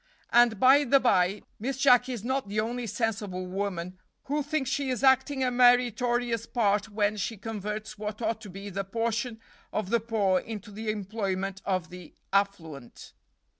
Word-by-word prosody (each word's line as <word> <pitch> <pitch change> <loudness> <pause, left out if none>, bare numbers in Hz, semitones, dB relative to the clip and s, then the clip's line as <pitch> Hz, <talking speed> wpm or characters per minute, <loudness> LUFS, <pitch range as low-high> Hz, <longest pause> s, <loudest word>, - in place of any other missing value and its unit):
And, 235 -3 +5
by 270 +4 +6
the 275 +1 +4
by, 195 -5 +2 0.2
Miss 260 +4 -3
Jacky 250 -1 +4
is 235 -5 -5
not 260 -1 -1
the 205 +2 -2
only 235 +2 -2
sensible 205 -4 -2
woman 185 -1 -4 0.2
who 295 +2 -1
thinks 290 -2 -2
she 280 -1 -1
is 255 0 -2
acting 265 +1 +3
a 250 - +1
meritorious 245 -1 +3
part 210 -2 +1
when 210 0 0
she 220 +2 -3
converts 210 0 -5
what 210 0 -5
ought 225 -1 -2
to 210 - -9
be 195 +2 -8
the 195 +1 -2
portion 230 +3 -2 0.3
of 205 -3 -3
the 235 - +4
poor 205 -4 +1
into 210 -1 -8
the 215 +2 -5
employment 195 -2 -3
of 185 -3 -1
the 180 -2 -11 0.2
affluent. 165 -10 -2
220 Hz, 170 wpm, -28 LUFS, 200-245 Hz, 0.3 s, by